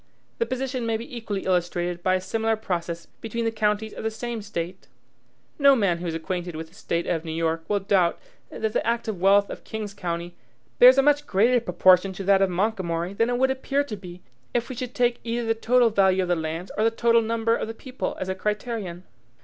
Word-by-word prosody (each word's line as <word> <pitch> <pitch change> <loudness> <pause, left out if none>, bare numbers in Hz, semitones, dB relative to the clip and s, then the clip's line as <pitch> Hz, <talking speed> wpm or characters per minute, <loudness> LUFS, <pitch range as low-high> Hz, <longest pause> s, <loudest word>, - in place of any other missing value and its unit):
The 230 - +1
position 255 -1 -3
may 225 -1 +1
be 235 +2 -9
equally 210 -4 -4
illustrated 175 -1 0
by 185 +1 +2
a 185 - -1
similar 225 +3 0
process 170 -5 -4
between 230 +1 -5
the 225 - +1
counties 215 0 0
of - - -7
the 220 - +1
same 230 +1 -5
State. 185 -3 -5 0.7
No 280 -1 +7
man 195 -8 +1
who 175 - -4
is 165 - -2
acquainted 175 +1 -4
with 160 0 -6
the - - -25
State 170 -4 -2
of 165 -2 -1
New 160 - -5
York 165 0 -1
will 205 -1 +1
doubt 190 -3 +2 0.3
that 220 -1 -3
the - - +1
active 225 -5 -2
wealth 200 +1 +4
of - - -8
King's 215 -2 -5
County 175 -2 -4 0.4
bears 255 +2 +9
a 275 - +5
much 290 +1 +3
greater 235 +6 +3
proportion 185 -1 +4
to 195 - -6
that 195 0 +4
of 195 - +3
Montgomery 180 -2 -1
than 230 +3 +1
it 245 - 0
would 265 +1 +3
appear 275 +2 0
to 240 -7 -6
be 180 -2 -11 0.3
if 240 0 0
we 255 - -5
should 250 0 -6
take 240 -1 +2
either 235 0 -2
the 225 - +2
total 235 +1 +3
value 190 -2 +3
of 180 - -4
the 175 - +3
lands 160 +3 -4
or 215 - +1
the 225 - +5
total 230 0 +3
number 230 0 +1
of - - -3
the 225 - -6
people 255 +2 -5
as 185 - -3
a 190 - -1
criterion! 210 -2 -3
210 Hz, 225 wpm, -25 LUFS, 180-230 Hz, 0.7 s, bears